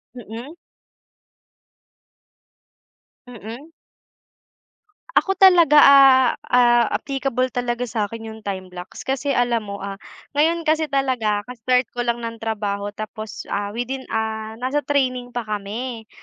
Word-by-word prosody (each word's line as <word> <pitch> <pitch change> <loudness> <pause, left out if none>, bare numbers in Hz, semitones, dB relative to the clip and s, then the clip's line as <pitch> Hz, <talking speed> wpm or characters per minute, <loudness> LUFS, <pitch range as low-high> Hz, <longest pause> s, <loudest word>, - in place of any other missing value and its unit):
Mm. 240 +5 -9 2.7
Mm. 245 +6 -10 1.4
Ako 385 0 +2
talaga, 345 -6 +6
ah, 270 -3 +7 0.2
ah, 240 -2 +4
applicable 270 -2 -1
talaga 245 0 -2
sa'kin 225 0 -4
yung 220 - -12
time 195 -3 -5
blocks 180 0 -9
kasi 270 +1 -2
alam 245 -3 +1
mo, 200 - -5
ah, 200 0 -6 0.4
ngayon 325 +3 +1
kasi 315 0 +1
talaga 245 -7 0
ka-start 250 +1 0
ko 245 - -2
lang 235 -1 0
ng 230 -1 -7
trabaho 205 -2 -2
tapos, 215 0 -7
ah, 200 0 -3
within, 245 +4 -5
ah, 220 0 -3
nasa 260 +5 -1
training 255 -4 -1
pa 240 -1 -4
kami 220 +3 -5
240 Hz, 120 wpm, -21 LUFS, 220-270 Hz, 2.7 s, ah